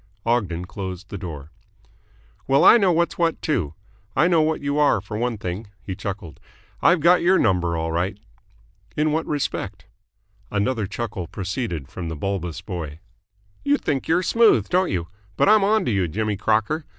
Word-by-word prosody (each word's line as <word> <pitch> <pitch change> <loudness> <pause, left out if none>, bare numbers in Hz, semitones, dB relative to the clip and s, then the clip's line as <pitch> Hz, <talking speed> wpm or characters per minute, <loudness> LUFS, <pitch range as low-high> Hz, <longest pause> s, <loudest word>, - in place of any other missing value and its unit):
Ogden 100 -8 0
closed 95 0 -7
the 100 - -4
door. 75 -4 -7 1.0
"Well, 135 +1 +4
I - - +9
know 195 -5 +3
what's 170 +1 0
what, 165 -2 +1
too. 90 - -1 0.4
I 160 - +4
know 170 -3 +4
what 155 0 +1
you 140 +1 -1
are 145 -7 +4
for 100 +2 -8
one 120 +1 -1
thing." 95 +3 -5 0.2
He 95 - -5
chuckled. 95 -7 -6 0.4
"I've 175 -2 +4
got 175 +3 +5
your 185 +2 +4
number 90 -5 +1
all 80 0 -2
right." 90 +5 -1 0.8
"In 155 +1 +2
what 160 +2 -1
respect?" 145 -2 -3 0.6
Another 105 +1 0
chuckle 105 -3 -4
proceeded 95 - -4
from 85 +2 -6
the 80 - -4
bulbous 90 0 -3
boy. 80 -6 -6 0.6
"You 285 +1 +3
think 140 - -2
you're 175 +3 +2
smooth, 215 - +4
don't 185 +1 +2
you? 85 -3 -2 0.3
But - - +3
I'm 215 0 +6
onto 210 - +2
you, 95 -4 +1
Jimmy 105 +6 -1
Crocker. 110 +10 0
105 Hz, 170 wpm, -23 LUFS, -, 1.0 s, I